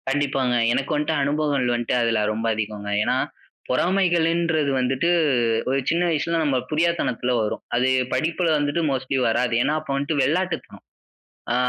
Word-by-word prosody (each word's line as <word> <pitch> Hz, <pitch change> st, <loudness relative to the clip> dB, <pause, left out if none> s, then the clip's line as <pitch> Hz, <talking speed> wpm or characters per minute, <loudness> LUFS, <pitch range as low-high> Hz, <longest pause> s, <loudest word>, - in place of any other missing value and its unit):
கண்டிப்பாங்க. 135 Hz, -3 st, 0 dB, 0.2 s
எனக்கு 140 Hz, +4 st, -1 dB
வன்ட்டு 150 Hz, +2 st, 0 dB
அனுபவங்கள் 145 Hz, -3 st, 0 dB
வன்ட்டு 120 Hz, -1 st, -2 dB
அதுல 115 Hz, -2 st, +1 dB
ரொம்ப 110 Hz, +1 st, -4 dB
அதிகங்க. 105 Hz, -1 st, -4 dB
ஏன்னா -, -, +1 dB, 0.5 s
பொறாமைகளுன்றது 170 Hz, -1 st, +1 dB
வந்துட்டு 130 Hz, +6 st, 0 dB, 0.6 s
ஒரு 135 Hz, +1 st, +1 dB
சின்ன 170 Hz, +1 st, +1 dB
வயசுல 165 Hz, +1 st, 0 dB
நம்ம 140 Hz, -4 st, +1 dB
புரியாத்தனத்துல 155 Hz, -6 st, 0 dB
வரும். 105 Hz, -, -3 dB
அது 125 Hz, +2 st, +2 dB, 0.2 s
படிப்புல 165 Hz, +2 st, 0 dB
வந்துட்டு 145 Hz, +3 st, 0 dB
மோஸ்ட்லி 130 Hz, 0 st, -1 dB
வராது. 120 Hz, +1 st, 0 dB
ஏன்னா 150 Hz, -, 0 dB
அப்போ 155 Hz, -, -7 dB
வன்ட்டு 145 Hz, +2 st, -1 dB
வெளாட்டுத்தனம். 170 Hz, +4 st, -2 dB, 0.7 s
அ -, -, +1 dB
145 Hz, 140 wpm, -23 LUFS, 125-165 Hz, 0.7 s, அது